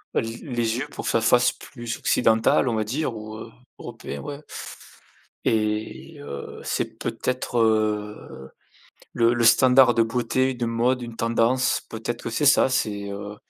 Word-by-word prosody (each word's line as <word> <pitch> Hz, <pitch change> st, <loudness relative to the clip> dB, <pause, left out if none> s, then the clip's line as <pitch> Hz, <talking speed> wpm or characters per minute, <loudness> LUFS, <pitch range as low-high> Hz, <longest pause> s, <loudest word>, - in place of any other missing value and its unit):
les 115 Hz, +1 st, -1 dB
les 120 Hz, -3 st, -2 dB
yeux 145 Hz, -, -3 dB
pour -, -, -7 dB
que -, -, 0 dB
ça 115 Hz, -, +2 dB
fasse 120 Hz, +2 st, +4 dB
plus 120 Hz, -3 st, -7 dB
occidental, 115 Hz, +2 st, +3 dB
on 115 Hz, -, 0 dB
va 110 Hz, -, 0 dB
dire, 125 Hz, +2 st, -2 dB
ou 110 Hz, 0 st, -8 dB
heu, 115 Hz, +1 st, -9 dB, 0.3 s
européen, 70 Hz, -, -7 dB
ouais 145 Hz, +1 st, -7 dB, 1.0 s
et 110 Hz, +7 st, -1 dB
heu, 70 Hz, -, -8 dB
c'est -, -, -3 dB
peut-être, 125 Hz, -1 st, -2 dB
heu, 105 Hz, -, -1 dB, 0.6 s
le 115 Hz, 0 st, +3 dB
le 120 Hz, -1 st, 0 dB
standard 125 Hz, +2 st, +6 dB
de 115 Hz, -, +3 dB
beauté, 125 Hz, +3 st, 0 dB
de 120 Hz, -1 st, -3 dB
mode, 120 Hz, +2 st, +1 dB
une 120 Hz, -1 st, -7 dB
tendance 115 Hz, +2 st, +1 dB
peut-être 115 Hz, +2 st, -5 dB
que -, -, -3 dB
c'est 115 Hz, +6 st, -1 dB
ça, 135 Hz, -, +5 dB
c'est 105 Hz, -5 st, -1 dB
heu 100 Hz, +1 st, -6 dB
115 Hz, 160 wpm, -24 LUFS, 110-125 Hz, 1.0 s, standard